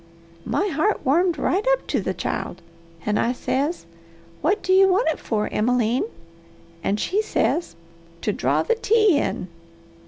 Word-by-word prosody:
My 405 - 0
heart 340 +7 0
warmed 335 +5 +3
right 375 +8 0
up - - -2
to - - -1
the - - -3
child, 180 - -4 0.4
and 210 0 +1
I 240 - +1
says, 280 - -2 0.6
'What 385 +8 +1
do 375 - +2
you 385 +1 +7
want 385 +5 +2
it 320 - -2
for, 215 -2 -1
Emmeline?' 245 - +1 0.7
And 205 +4 0
she 400 - +1
says, 345 - -1 0.5
'To 210 - 0
draw - - +1
the 470 - +2
tea 430 -7 +3
in.' 185 - -2
330 Hz, 155 wpm, -23 LUFS, 245-395 Hz, 0.7 s, you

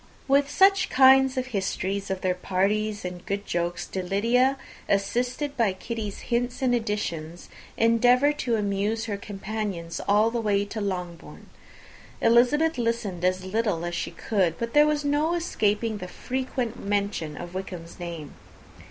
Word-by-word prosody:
With 280 +1 +3
such 385 +5 +4
kind 265 0 +6
of 255 - 0
histories 200 -3 -2
of 190 -1 -3
their 185 -1 +1
parties 200 +3 -1
and 180 -1 -6
good 200 +1 -3
jokes 175 0 -2
did 185 -2 -5
Lydia, 245 +7 +2 0.3
assisted 250 +8 0
by 225 -6 +2
Kitty's 210 +1 -5
hints 245 +2 -1
and 250 -1 +3
additions, 180 -8 -3 0.3
endeavour 245 +5 +4
to 250 -5 -1
amuse 210 +2 -1
her 210 -3 -2
companions 200 -4 -5
all 210 +3 +4
the 235 0 -1
way 205 -2 +1
to 215 +1 -5
Longbourn. 180 -4 -6 0.7
Elizabeth 250 +6 +3
listened 230 -7 -2
as 185 +1 +1
little 200 -4 -1
as 175 - -4
she - - -2
could, 185 -7 0
but 235 0 -4
there 295 0 +6
was 300 -1 0
no 300 +4 +1
escaping 220 -9 0
the 180 - -6
frequent 255 +1 -4
mention 200 -6 -2
of 175 0 -8
Wickham's 180 -3 -7
name. 170 -4 -7
210 Hz, 150 wpm, -26 LUFS, 185-245 Hz, 0.7 s, kind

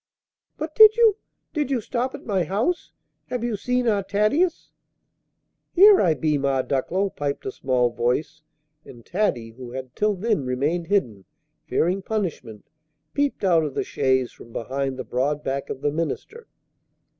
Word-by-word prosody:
"But 310 +1 -5
did 435 +3 +8
you 450 -3 +5 0.4
did 295 -4 -1
you 265 -3 +1
stop 250 +3 -3
at - - -11
my 195 -5 +1
house? 220 - -1 0.4
Have 250 -2 -3
you 240 -2 -1
seen 250 +4 -1
our 205 -3 +2
Thaddeus?" 215 - 0 1.0
"Here 400 +2 +8
I 165 -4 +3
be, 150 +1 0
Ma 135 -1 +1
Ducklow!" 185 +9 -1
piped 145 -1 -4
a 130 - -2
small 125 -2 +1
voice; 125 +6 -1 0.4
and 120 -2 -14
Taddy, 150 - -1
who 125 +1 -10
had 130 -1 -7
till 210 0 +1
then 205 -5 0
remained 145 +7 -1
hidden, 120 - 0 0.4
fearing 185 +4 +1
punishment, 170 - -4 0.5
peeped 285 -5 -1
out 170 -4 +4
of 145 -3 -4
the - - 0
chaise 130 -2 0
from 115 - -15
behind 135 +3 -3
the 130 - -4
broad 145 +5 -1
back 135 +1 -3
of 135 - -5
the 145 - +1
minister. 165 - -4
165 Hz, 160 wpm, -24 LUFS, -, 1.0 s, did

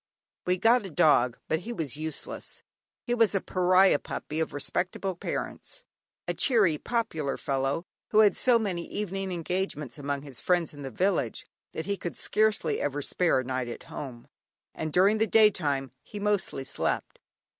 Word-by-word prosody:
We 180 0 +3
got 225 +5 +4
a 195 - -6
dog, 125 -6 +4
but 160 - +1
he 225 +7 -6
was 160 - -3
useless. 155 0 -6 0.4
He 240 - -1
was 225 -4 +3
a - - +3
pariah 185 -2 +4
puppy, 155 - -5
of 160 - -1
respectable 180 +6 -2
parents; - - -5 0.4
a - - 0
cheery, 205 - +3
popular 160 - -2
fellow, 135 +5 -1 0.2
who 215 - +5
had 210 -2 +5
so 250 -2 +4
many 190 -6 -2
evening 195 -2 -3
engagements 170 -5 -3
among 140 0 -3
his 135 -5 -8
friends 175 -3 +1
in 145 - -10
the 135 - -5
village, 170 - 0 0.3
that 160 - -4
he 200 +1 -1
could 175 - -5
scarcely 215 0 +1
ever 145 0 -1
spare 170 -5 +2
a - - -7
night 130 -1 -2
at 120 - -7
home; 125 -5 -7 0.5
and 155 0 -4
during 195 +6 +4
the 220 - +3
day 215 0 +6
time 135 - -1
he 210 - -9
mostly 205 -9 0
slept. - - -2
175 Hz, 170 wpm, -28 LUFS, 145-205 Hz, 0.5 s, day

